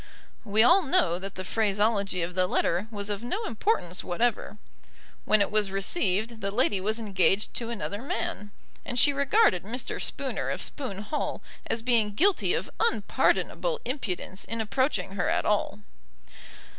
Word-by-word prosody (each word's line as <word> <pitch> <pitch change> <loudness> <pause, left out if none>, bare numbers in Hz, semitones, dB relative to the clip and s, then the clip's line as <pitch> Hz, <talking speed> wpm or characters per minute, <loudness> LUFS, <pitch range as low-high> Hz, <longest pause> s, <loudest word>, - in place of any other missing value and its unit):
We 215 0 +3
all 350 +10 +6
know 180 - +2
that 195 0 -6
the 185 - -5
phraseology 200 -2 +1
of 175 +2 -4
the 185 0 +2
letter 180 +3 0
was 205 -2 -4
of 200 0 -3
no 370 - -3
importance 215 - -1
whatever. 215 +3 -1 0.7
When 215 -1 +4
it 200 - +1
was 210 -2 +2
received 210 - -1
the 195 - -1
lady 205 -2 +1
was 215 +3 0
engaged 200 -2 +1
to 230 -1 -3
another 210 -2 -4
man; 210 -5 -3 0.3
and 245 - -4
she 285 +3 +5
regarded 280 - +3
Mr. 235 +5 -3
Spooner - - -2
of - - -2
Spoon 215 -8 -3
Hall 295 +8 -3 0.2
as 225 - -2
being 225 -4 +2
guilty 390 - +3
of - - -3
unpardonable 475 +1 +1
impudence 205 -7 -4
in 230 - -5
approaching 215 -3 0
her 195 -2 -1
at - - 0
all. 205 - 0
210 Hz, 155 wpm, -27 LUFS, 195-245 Hz, 0.7 s, all